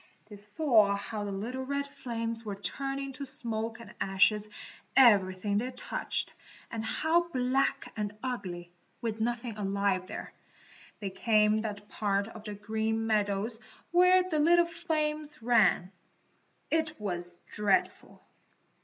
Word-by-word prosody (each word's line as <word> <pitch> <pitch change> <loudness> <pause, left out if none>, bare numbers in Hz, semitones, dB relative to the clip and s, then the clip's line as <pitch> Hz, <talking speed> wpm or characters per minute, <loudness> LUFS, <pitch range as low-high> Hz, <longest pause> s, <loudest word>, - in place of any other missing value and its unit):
They 210 - -9
saw 210 -1 +3
how 210 +1 -4
the 200 - -3
little 235 +7 -4
red 280 +1 -1
flames 230 -5 -4
were 205 -3 -4
turning 275 +6 -3
to 280 - -6
smoke 230 -3 -3
and 225 -3 -11
ashes 205 +2 +3 0.5
everything 200 -4 +5
they 250 +3 -2
touched, 250 - -2 0.4
and 225 -1 -3
how 330 +9 +1
black 260 -1 0
and 210 -1 -3
ugly, 180 -9 -4 0.3
with 225 -1 -3
nothing 240 0 -2
alive 195 -2 0
there, - - -7 0.7
became 210 +1 +2
that 205 -2 -5
part 200 -1 0
of 220 -1 -11
the 210 -1 -5
Green 220 +2 -1
Meadows 215 +1 +1 0.3
where 365 +1 +5
the 315 -4 0
little 345 +3 +5
flames 305 -2 -2
ran. 205 -6 +4 0.8
It 315 -3 0
was 175 -4 -4
dreadful! 205 -2 0
220 Hz, 125 wpm, -30 LUFS, 205-270 Hz, 0.8 s, everything